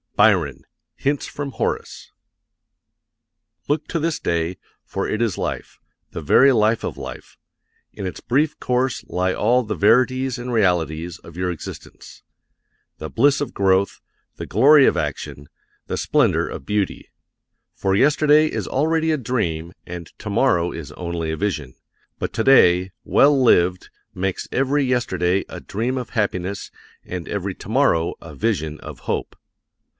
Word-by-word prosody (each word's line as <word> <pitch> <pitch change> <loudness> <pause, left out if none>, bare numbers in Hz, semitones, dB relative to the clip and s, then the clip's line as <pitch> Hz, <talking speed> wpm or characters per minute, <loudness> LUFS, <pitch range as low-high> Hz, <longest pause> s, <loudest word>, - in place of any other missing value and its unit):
BYRON, - - +3 0.3
Hints 140 +1 -1
from 145 -1 -5
Horace. - - -3 1.6
Look 145 +2 -1
to 170 - -2
this 165 +1 -1
day, 85 +1 -1 0.3
for - - -3
it 110 - -2
is 115 -6 0
life - - -4 0.3
the - - -6
very 130 - +5
life 110 -1 +2
of - - -4
life. - - -9 0.6
In 100 - -6
its 90 - -5
brief 145 +5 0
course 125 0 0
lie 90 +1 0
all 125 +4 +2
the 105 -2 -3
verities 130 - +3
and 125 +1 -5
realities 85 -5 0
of 85 0 -14
your 90 0 -1
existence: 85 - -10 0.8
the - - -5
bliss 140 +5 +3
of 145 - -3
growth, 95 0 +2 0.4
the - - -6
glory 140 - +6
of - - +3
action, 70 0 -4 0.4
the - - -3
splendor - - +2
of 65 - -8
beauty. 105 -2 -2 0.7
For 95 0 0
yesterday 150 +5 +4
is - - -3
already 160 +3 +1
a 155 - +1
dream 90 - -2 0.2
and 85 -1 -7
tomorrow 100 -5 +1
is 80 -4 -7
only 85 -2 -4
a 80 - -3
vision; 75 -10 -3 0.4
but - - -3
today, 95 -7 +4
well 140 0 +4
lived, 90 -7 +3 0.2
makes 95 0 -3
every 140 +2 +1
yesterday 95 -8 0
a - - -7
dream 120 +6 -3
of 125 -2 -5
happiness 100 -3 -2 0.3
and 90 -2 -6
every 100 -1 -3
tomorrow 105 -8 +1
a 80 -3 -10
vision 80 -4 -1
of - - -10
hope. - - -3
105 Hz, 145 wpm, -21 LUFS, 90-130 Hz, 1.6 s, glory